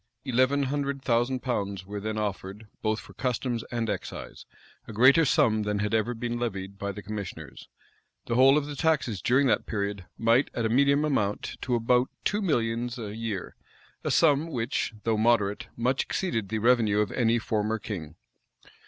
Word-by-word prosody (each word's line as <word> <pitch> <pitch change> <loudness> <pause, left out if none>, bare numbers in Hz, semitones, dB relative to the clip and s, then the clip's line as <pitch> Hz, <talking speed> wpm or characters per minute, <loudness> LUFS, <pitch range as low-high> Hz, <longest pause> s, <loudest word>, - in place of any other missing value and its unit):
Eleven 130 +2 +2
hundred 140 0 -2
thousand 120 +2 +1
pounds 100 -6 -2
were 105 +1 -5
then 110 +1 -3
offered, 100 0 -4 0.2
both 110 0 0
for - - -13
customs 125 -2 -2
and 115 -2 -2
excise, - - -6 0.4
a - - -8
greater 130 +9 +6
sum 110 -4 +3
than 105 0 -1
had 105 +1 -1
ever 115 +2 +1
been 120 +1 -3
levied 100 -4 -4
by 100 0 -2
the 105 +1 -9
commissioners:[] 95 -9 -7 0.6
the - - -2
whole 135 +4 +6
of 150 - 0
the 145 0 -6
taxes 140 - 0
during 130 +3 +3
that 125 - +1
period 100 -3 -3
might 115 +4 +3
at 115 - -1
a - - +1
medium 140 +4 +3
amount 105 -9 -1
to 125 - 0
above 125 +2 +2 0.2
two 210 +1 +1
millions 120 - 0
a 105 -3 -6
year; 110 -5 -4 0.5
a - - -1
sum 155 -1 +3
which, 120 -4 -2
though 110 -1 +1
moderate, 110 0 +2
much 125 +3 +1
exceeded 115 - -2
the 110 - -1
revenue 115 -2 +3
of 105 -1 +1
any 115 -1 +2
former 110 -1 -1
king. 90 - -6
115 Hz, 175 wpm, -27 LUFS, 105-130 Hz, 0.6 s, greater